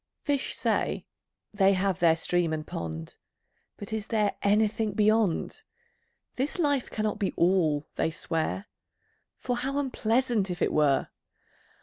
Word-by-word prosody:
Fish 285 -2 -1
say, - - 0 0.5
they 195 -1 +4
have 190 -1 0
their 165 -2 +5
Stream 170 0 0
and 155 -1 -3
Pond; 80 - -6 0.6
But 205 +1 -7
is 220 -1 -3
there 210 -3 +1
anything 215 +1 +2
Beyond? 215 -3 +1 0.8
This 270 +7 -1
life 285 -6 +1
cannot 215 0 -2
be 200 - -1
All, 165 -5 +2
they - - +1
swear, 165 +4 -2 0.7
For 245 -1 -2
how 270 +3 -2
unpleasant, 240 -5 +1
if 175 -1 -4
it - - +1
were! 150 -3 +2
205 Hz, 130 wpm, -28 LUFS, 170-225 Hz, 0.8 s, their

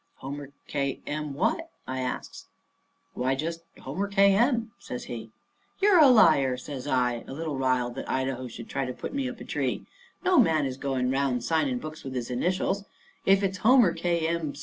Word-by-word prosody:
"Homer 140 +1 -7 0.2
K. 140 -2 -2
M. 150 -1 -4
what?" 230 - 0 0.2
I 130 0 -3
asks. 125 -1 -5 0.7
"Why, 130 +2 0
just 165 +4 -3 0.2
Homer 180 +10 -3
K. 200 0 +5
M.," 235 0 +2
says 125 - -6
he. 115 -2 -7 0.5
"You're 395 -3 +5
a 300 - +9
liar," 145 - +5
says 130 +1 -7
I, 125 -3 +1
a - - -7
little 155 0 -3
riled 130 -2 +1
that 135 - -6
Idaho 130 -1 -1
should 115 -1 -9
try 135 - -2
to 125 -1 -3
put - - -6
me 275 -2 -1
up 250 - -9
a - - -7
tree. - - -2 0.4
"No 365 -2 +5
man 160 - +4
is 130 -1 -3
going 130 -2 -1
'round 135 -3 0
signing 145 -5 +1
books 155 +4 -8
with 135 -1 -6
his 125 -1 -3
initials. 185 +8 0 0.4
If 195 +1 +5
it's 190 0 -1
Homer 235 -6 +5
K. 170 -1 0
M. 165 -3 -1
145 Hz, 190 wpm, -27 LUFS, 130-195 Hz, 0.7 s, a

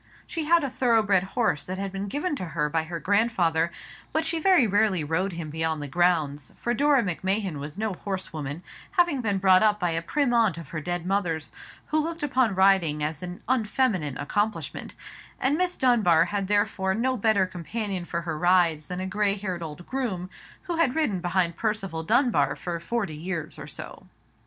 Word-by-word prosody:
She 325 -3 -4
had 335 0 +4
a 275 - -1
thorough 235 -4 +3
bred 200 -3 +3
horse 190 -3 -1
that 185 +1 -4
had 195 0 -3
been 195 +1 -4
given 295 - -2
to - - -5
her 150 -1 +1
by 160 +1 0
her 170 +1 -5
grandfather, 175 -4 +2 0.4
but 315 +1 0
she 325 0 0
very 355 -6 +5
rarely 205 -4 +2
rode 175 +6 -1
him 165 -3 -6
beyond 160 0 -1
the 145 - -5
grounds, 150 -4 +1
for 240 - -1
Dora 285 0 +3
Macmahon 190 -2 -1
was 145 +4 -7
no 215 -1 -1
horsewoman, 170 -5 -5 0.3
having 345 -8 +2
been 205 -4 0
brought 190 -1 +5
up 210 -1 +3
by 175 -3 0
a 165 0 -1
prim 275 - 0
aunt 225 -7 +3
of 165 -5 -9
her 155 - -4
dead 175 +1 -3
mother's, 175 -5 -1 0.3
who 310 - 0
looked 330 0 -3
upon 260 -7 +2
riding 185 -6 +3
as 155 0 -3
an 180 +1 -7
unfeminine 215 - +1
accomplishment; 205 +9 -2 0.4
and 270 +3 +2
Miss 360 +2 0
Dunbar 225 -10 +4
had 200 -2 -2
therefore 205 -2 +1
no 255 +4 +1
better 215 -4 +3
companion 185 +2 -4
for 170 0 -3
her 165 -2 -4
rides 175 -4 +3
than 180 0 -4
a - - -2
grey 200 +1 +1
haired 190 -4 -4
old 165 +2 -7
groom, 200 -9 -3 0.3
who 350 -3 -3
had 300 -6 +2
ridden 265 - +1
behind 175 -1 0
Percival 205 -7 -2
Dunbar 215 - +2
for 170 -2 -4
forty 195 -2 -2
years 160 -1 -5
or - - -8
so. - - -10
190 Hz, 190 wpm, -26 LUFS, 170-230 Hz, 0.4 s, very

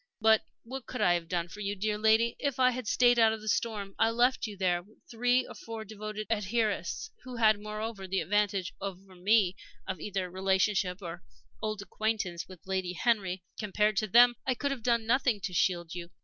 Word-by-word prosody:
"But 220 0 +5 0.2
what 260 +2 -7
could 250 - -5
I 175 - +5
have 170 -1 -2
done 170 -1 -1
for 190 +5 -11
you, 200 0 -2
dear 210 +2 -1
lady, 220 +2 +3
if 280 -2 -2
I 255 0 +5
had 250 -2 -5
stayed 245 +1 +4
out 220 -1 +4
the 215 - -11
storm? 210 -3 -1
I 225 - +4
left 240 +1 +2
you 205 -2 -8
with 180 +2 -1
three 245 +2 +2
or - - -9
four 225 -1 -7
devoted 215 0 -6
adherents, 210 -3 -1
who 255 -1 -8
had, 215 -3 +4
moreover, 215 -1 -5
the 190 +1 0
advantage 195 +1 0
over 195 -1 -7
me 190 +1 +3 0.3
of 185 - -3
either 190 0 -3
relationship 190 +1 0
or 170 0 -6 0.4
old 215 -2 -3
acquaintance 200 -3 -2
with 185 -3 -13
Lady 190 -2 -2
Henry. 190 -3 0 0.2
Compared 210 0 +1
to 215 - +1
them, 240 +4 +7
I 255 - 0
could 280 +3 -1
have 270 -3 -4
done 235 -1 +1
nothing 250 -2 +2
to 185 - -4
shield 175 -2 +1
you. 170 -1 -6
210 Hz, 195 wpm, -30 LUFS, 190-230 Hz, 0.4 s, them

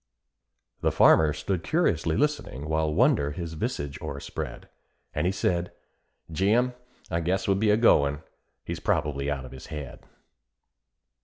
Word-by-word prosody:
'" - - -51
The - - +2
farmer 80 -1 +5
stood 85 +3 -3
curiously 85 - +1
listening, 110 - -1
while 80 0 +1
wonder 100 - +3
his 85 -1 -5
visage 70 -2 -4
o'erspread; 70 0 -6 0.5
And - - 0
he - - +2
said, 90 -2 -1 0.6
"Jim, 110 +9 +2 0.4
I 85 - +1
guess 90 +3 -1
we'll 95 -1 +3
be 105 0 +3
goin'; 75 -10 +3 0.4
he's - - -4
probably 70 -2 0
out 70 -3 -3
of 65 - -11
his 65 -1 -10
head." 75 -4 -7
80 Hz, 140 wpm, -27 LUFS, 75-100 Hz, 0.6 s, farmer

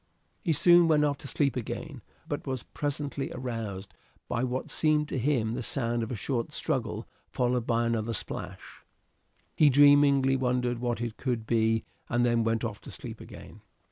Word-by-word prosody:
He 170 - 0
soon 175 +2 +6
went 150 -2 +4
off 145 -2 -1
to - - -9
sleep 140 -1 +1
again, 125 -4 -5 0.3
but - - -4
was 130 -2 -3
presently 145 -1 -3
aroused 110 -7 -5 0.3
by 120 +1 -1
what 130 0 -2
seemed 150 -1 +2
to 135 - -2
him 120 -4 +1
the - - -3
sound 120 -1 -1
of 115 - -3
a - - -2
short 120 +5 -2
struggle 115 -9 -2 0.2
followed 125 -1 0
by 115 0 +2
another 115 -1 -1
splash; 95 -3 -7 0.7
he 150 - +6
dreamingly 140 -1 +5
wondered 125 -2 0
what 120 -2 -2
it 120 -2 -4
could 120 -4 -2
be 110 -1 +2 0.3
and 120 0 +2
then 120 -1 +2
went 115 +1 0
off 110 -3 -4
to - - -11
sleep - - -7
again. - - -12
125 Hz, 175 wpm, -28 LUFS, 115-140 Hz, 0.7 s, soon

